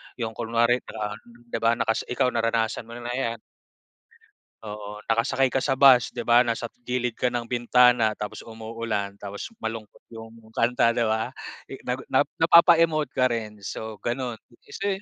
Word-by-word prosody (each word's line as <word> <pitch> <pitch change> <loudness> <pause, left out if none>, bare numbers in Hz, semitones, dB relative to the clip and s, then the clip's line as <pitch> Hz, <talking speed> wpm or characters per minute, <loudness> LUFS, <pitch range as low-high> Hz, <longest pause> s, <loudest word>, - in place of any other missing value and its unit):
'yong 115 -3 -3
kunwari 115 +2 +1
parang, 105 -1 -5
'di 120 -1 -7
ba, 115 +1 +3
nakas 110 -1 -1
ikaw 125 +1 +1
naranasan 115 -1 -1
mo 115 - -9
na 120 0 -6
'yan. 115 -3 -2 1.3
Oo, 105 0 -7
nakasakay 115 +3 +1
ka 130 - +1
sa 135 -2 0
bus, 130 -3 +7
'di 120 -2 -6
ba, 120 +1 +6
nasa 120 -1 -2 0.2
gilid 125 -1 -2
ka 125 - 0
ng 120 -1 -3
bintana, 120 -1 +4
tapos 105 - -6
umuulan, 110 -3 -4
tapos 100 - -8
malungkot 110 -1 -6
'yong 115 0 -12
kanta, 115 +1 +2
'di 115 0 0
ba? 110 +3 0 0.4
I 135 - -7
nag 125 +1 -2 0.4
napapa-emote 165 -2 +5
ka 130 -1 +2
rin, 110 -3 -4
so 110 +1 -7
gano'n. 120 0 -2 0.2
Eh, 120 - -22
kasi 200 - -4
115 Hz, 160 wpm, -25 LUFS, 110-125 Hz, 1.3 s, bus